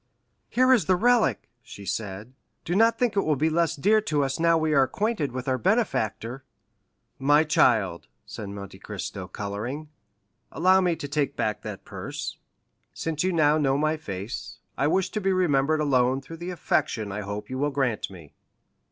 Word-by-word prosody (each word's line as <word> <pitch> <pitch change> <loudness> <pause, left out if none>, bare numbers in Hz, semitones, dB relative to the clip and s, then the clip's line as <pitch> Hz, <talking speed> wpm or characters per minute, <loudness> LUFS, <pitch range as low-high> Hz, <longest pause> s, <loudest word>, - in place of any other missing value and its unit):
"Here 255 +1 +4
is 240 - +3
the 185 - +3
relic," 240 +4 +2
she 100 -3 -11
said; 105 +3 -4 0.3
"do 175 - -1
not 225 +3 +4
think 245 -4 +1
it 200 - +3
will 155 -4 +1
be 155 +4 +1
less 170 0 +1
dear 210 +9 +3
to 150 -8 0
us 135 +2 -2
now 165 0 +4
we 155 -1 +1
are 140 - +5
acquainted 165 - 0
with 125 +1 -5
our 130 -1 +1
benefactor!" 135 - 0 0.8
"My 145 +3 +5
child," 110 - +2 0.2
said 105 -2 -7
Monte 100 -1 -8
Cristo, - - -6
coloring, 120 +10 -5 0.6
"allow 185 +3 +4
me 175 -2 +2
to 155 -3 -6
take 145 0 -1
back 105 -1 -1
that 100 -3 -7
purse? - - -6 0.6
Since 160 -1 -2
you 185 - +1
now 155 -2 +3
know 135 -2 +2
my 155 +2 +1
face, 105 -5 -6 0.2
I 140 - +1
wish 190 +4 +1
to 215 - -2
be 195 0 +1
remembered 155 -4 +2
alone 130 -2 +2
through 140 +5 -10
the 175 +2 -6
affection 145 - -1
I 105 +2 -4
hope 100 +1 -5
you 130 - -3
will 145 +1 +1
grant 135 -6 -1
me. 85 -7 -13
145 Hz, 180 wpm, -26 LUFS, 115-170 Hz, 0.8 s, are